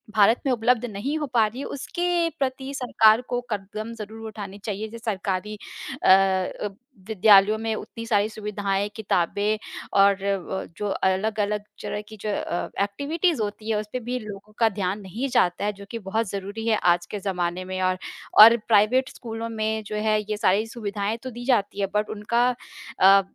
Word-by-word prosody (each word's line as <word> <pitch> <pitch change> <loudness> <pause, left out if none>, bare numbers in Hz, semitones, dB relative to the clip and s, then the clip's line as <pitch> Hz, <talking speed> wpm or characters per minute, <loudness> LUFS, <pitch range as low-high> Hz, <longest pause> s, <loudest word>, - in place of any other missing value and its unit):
भारत 220 +3 +5
में 270 - +2
उपलब्ध 245 0 +2
नहीं 240 +7 -3
हो 300 - -1
पा 230 -3 +5
रही 230 +5 -8
हैं, 280 - -4
उसके 345 +4 -1
प्रति 265 0 -2
सरकार 225 -3 +4
को 245 - 0
कदम 215 +2 -4
ज़रूर 220 +1 -8
उठाने 200 -2 -7
चाहिए। 210 0 -3
ज 230 - -9
सरकारी 200 -1 -2 0.5
अ - - +5
अ, 190 +1 +3 0.4
विद्यालयों 210 0 +5
में 225 0 -2
उतनी 230 +1 -7
सारी 210 -2 +2
सुविधाएँ, 205 -2 -2
किताबें 205 +1 0 0.4
और 195 -1 +4
अ, 195 -1 -2
जो 210 - -2
अलग-अलग 210 +2 0 0.2
तरह 205 - -3
की 220 - -10
जो 215 - -3
अ, 175 -3 -2
एक्टिविटीज़ 285 - 0
होती 215 +1 -4
हैं, 220 - +2
उसपे 210 +4 -4
भी 250 +1 -3
लोगों 210 -1 -10
का 225 -1 +5
ध्यान 200 0 -2
नहीं 220 +8 -4
जाता 180 -4 +2
है, 210 - +1
जो 200 0 -12
कि 230 - -4
बहुत 225 +1 0
ज़रूरी 200 +4 -5
है 220 -2 +3
आज 175 0 +3
के 210 - -3
ज़माने 180 -2 -2
में 185 0 -4
और 185 0 +1 0.5
और 230 +2 +9
प्राइवेट 230 +5 +4
स्कूलों 230 -1 -6
में 220 -1 -2
जो 210 - -5
है, 215 0 +2
ये 210 - -1
सारी 205 0 +2
सुविधाएँ 210 -2 -3
तो 260 - -4
दी 240 +1 -8
जाती 205 -6 +1
हैं, 195 - 0
बट 210 0 +1
उनका 235 +4 +2 0.5
अ, 195 +1 +8
215 Hz, 180 wpm, -24 LUFS, 200-230 Hz, 0.5 s, और